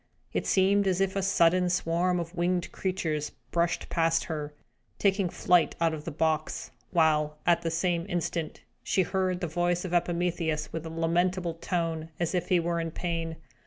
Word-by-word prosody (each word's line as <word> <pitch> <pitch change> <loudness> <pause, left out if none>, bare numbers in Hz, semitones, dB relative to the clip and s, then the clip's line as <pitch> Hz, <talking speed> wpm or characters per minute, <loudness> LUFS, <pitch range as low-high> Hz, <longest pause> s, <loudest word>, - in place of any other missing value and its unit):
It - - -1
seemed 195 +1 +3
as 185 -1 +1
if 195 0 +1
a 195 - +1
sudden 180 -1 +3
swarm 175 +1 +1
of 170 0 -5
winged 175 0 0
creatures 160 -6 -2 0.2
brushed 170 0 0
past 165 -1 +2
her, 150 -2 -4 0.5
taking 195 -2 +2
flight 175 -1 +3
out 165 -1 +2
of 155 -1 -6
the 165 - -3
box, 155 +1 -1 0.2
while, 155 -3 +2
at 170 -1 +4
the 165 - -1
same 170 +1 0
instant, 170 -3 -2 0.2
she 190 - +2
heard 185 0 -1
the 175 - -1
voice 175 +2 0
of 180 - -4
Epimetheus, 170 -3 0
with 165 0 -4
a - - -5
lamentable 170 +2 0
tone, 165 -1 -2
as 170 0 0
if 180 -1 -1
he 180 - +4
were 170 0 -1
in 165 0 -2
pain. 165 -1 -3
170 Hz, 175 wpm, -28 LUFS, 165-180 Hz, 0.5 s, at